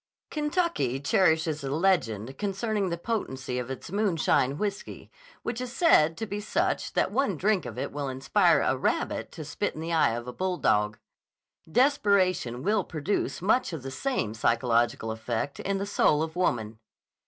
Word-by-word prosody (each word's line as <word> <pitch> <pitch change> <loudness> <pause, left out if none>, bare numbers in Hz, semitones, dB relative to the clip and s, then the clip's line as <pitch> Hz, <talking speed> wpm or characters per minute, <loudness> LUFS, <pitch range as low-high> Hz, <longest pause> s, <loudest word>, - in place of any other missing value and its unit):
Kentucky 300 - 0
cherishes 160 0 +2
a 135 - -3
legend 135 - 0
concerning 205 0 -1
the 170 - -2
potency 130 - -3
of 125 0 -5
its 135 +5 -7
moonshine 170 -9 +1
whiskey 200 +1 -5 0.3
which 235 +1 -3
is 250 -1 -4
said 165 - +4
to 225 - -3
be 205 -1 -4
such 210 - -1
that - - +1
one 235 - 0
drink 195 -1 +1
of - - -8
it - - -3
will 145 -1 -3
inspire 130 0 +3
a - - +2
rabbit - - -1
to - - -8
spit - - -3
in - - -7
the 165 +1 -3
eye 155 -8 +3
of 120 +1 -6
a 125 - -5
bulldog. 105 - +1 0.7
Desperation 195 - +2
will 205 +2 +2
produce 170 +3 -2
much 235 +6 +2
the 135 -6 -6
same 130 - -2
psychological 115 0 +1
effect 115 +4 -3
in 195 0 -1
the 195 - -2
soul 155 -6 +2
of 160 0 -5
woman. 115 -11 -1
165 Hz, 165 wpm, -27 LUFS, 130-205 Hz, 0.7 s, said